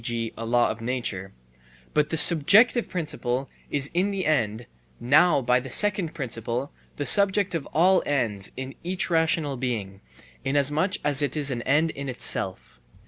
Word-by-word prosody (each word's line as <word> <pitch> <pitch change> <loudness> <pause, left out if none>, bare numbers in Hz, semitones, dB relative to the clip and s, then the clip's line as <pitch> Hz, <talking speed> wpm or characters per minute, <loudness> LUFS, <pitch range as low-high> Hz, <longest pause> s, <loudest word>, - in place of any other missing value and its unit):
g., 115 -1 -3
a 115 - -7
law 120 +1 +2
of 110 - -8
nature); 115 -6 -4 0.6
but 150 0 +1
the 160 - -1
subjective 200 - +5
principle 135 -6 -3 0.2
is 140 0 -1
in 185 +4 +1
the 195 -2 -3
end; 115 -7 0 0.3
now 145 +3 +3
by 125 +1 +2
the 130 +1 -9
second 190 +1 +2
principle 120 -1 -4 0.2
the 145 - -4
subject 200 0 +4
of 165 -4 -4
all 185 +4 +3
ends 115 -9 -1
is 130 +1 -6
each 180 +1 -2
rational 160 -4 0
being, 105 -6 -4 0.4
inasmuch 145 +7 +1
as 145 -1 +1
it 145 +1 -1
is 145 -2 +1
an 120 -2 -3
end 155 +6 +1
in 140 -2 -7
itself. 95 - -3
140 Hz, 160 wpm, -25 LUFS, 120-165 Hz, 0.6 s, subjective